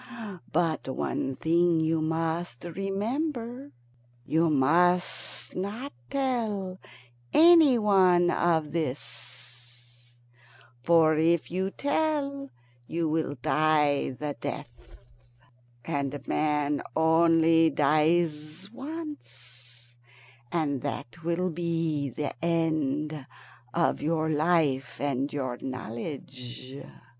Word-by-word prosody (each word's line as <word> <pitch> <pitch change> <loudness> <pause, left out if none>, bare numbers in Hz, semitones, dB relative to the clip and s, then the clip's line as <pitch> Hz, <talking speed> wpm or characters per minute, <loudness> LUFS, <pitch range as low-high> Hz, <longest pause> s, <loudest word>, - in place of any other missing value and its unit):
But 160 -2 0
one 130 0 -2
thing 170 +2 +2
you 160 0 +1
must 160 -2 -2
remember. 235 - -3 0.5
You 160 +4 +2
must 175 +6 +1
not 210 +9 -4 0.2
tell 220 -9 -2 0.5
any 320 -5 +7
one 185 -5 +4
of 160 -3 +1
this, 120 -4 -7 0.6
for 160 +2 +4
if 165 +1 +2
you 190 +2 -1
tell 285 +1 -1 0.4
you 165 -1 -1
will 155 -2 -1
die 150 -2 +2
the 150 -1 -3
death; 120 0 -7 0.9
and 140 +1 -3
man 150 -1 0
only 165 0 +4
dies 155 +4 +1
once, 125 - -10 0.5
and 145 -6 0
that 165 +9 -6
will 175 +2 0
be 165 -4 -1
an 150 -2 -1
end 155 -3 -1 0.4
of 170 +3 +1
your 160 0 0
life 155 -3 +1
and 140 0 -1
your 130 -4 -3
knowledge." 130 +1 -7
160 Hz, 90 wpm, -28 LUFS, 140-180 Hz, 0.9 s, any